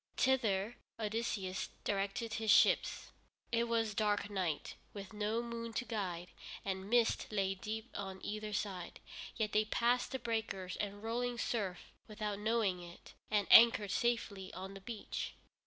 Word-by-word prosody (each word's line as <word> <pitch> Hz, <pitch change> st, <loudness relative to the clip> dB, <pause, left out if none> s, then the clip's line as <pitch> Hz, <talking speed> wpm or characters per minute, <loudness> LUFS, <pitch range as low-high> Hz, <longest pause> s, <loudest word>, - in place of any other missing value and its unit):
Thither 230 Hz, -4 st, +2 dB, 0.2 s
Odysseus 210 Hz, -3 st, -2 dB
directed 200 Hz, +3 st, -1 dB
his 220 Hz, 0 st, -1 dB
ships. -, -, +4 dB, 0.4 s
It 235 Hz, 0 st, +3 dB
was 225 Hz, -2 st, +1 dB
dark 205 Hz, -1 st, +1 dB
night, 180 Hz, -6 st, -1 dB, 0.2 s
with 200 Hz, +1 st, -8 dB
no 215 Hz, +2 st, 0 dB
moon 230 Hz, -1 st, -5 dB
to 250 Hz, -, -1 dB
guide, 180 Hz, -7 st, -3 dB, 0.4 s
and 190 Hz, 0 st, -3 dB
mist 235 Hz, -1 st, +3 dB
lay 195 Hz, -2 st, +1 dB
deep 220 Hz, +4 st, -5 dB
on 190 Hz, -1 st, -5 dB
either 215 Hz, 0 st, -3 dB
side, 195 Hz, -4 st, -3 dB, 0.4 s
yet 215 Hz, -2 st, 0 dB
they 215 Hz, -, +4 dB
passed 240 Hz, +3 st, +2 dB
the 265 Hz, -, -1 dB
breakers 220 Hz, -6 st, -2 dB
and 205 Hz, 0 st, -4 dB
rolling 240 Hz, +2 st, -1 dB
surf 200 Hz, -6 st, -2 dB, 0.2 s
without 210 Hz, -2 st, -3 dB
knowing 210 Hz, -4 st, +1 dB
it, 175 Hz, 0 st, -12 dB, 0.2 s
and 210 Hz, -2 st, +2 dB
anchored 225 Hz, -3 st, +8 dB
safely 210 Hz, -5 st, 0 dB
on 190 Hz, +2 st, -6 dB
the 195 Hz, -, -9 dB
beach. 220 Hz, +1 st, -5 dB
210 Hz, 145 wpm, -36 LUFS, 195-230 Hz, 0.4 s, anchored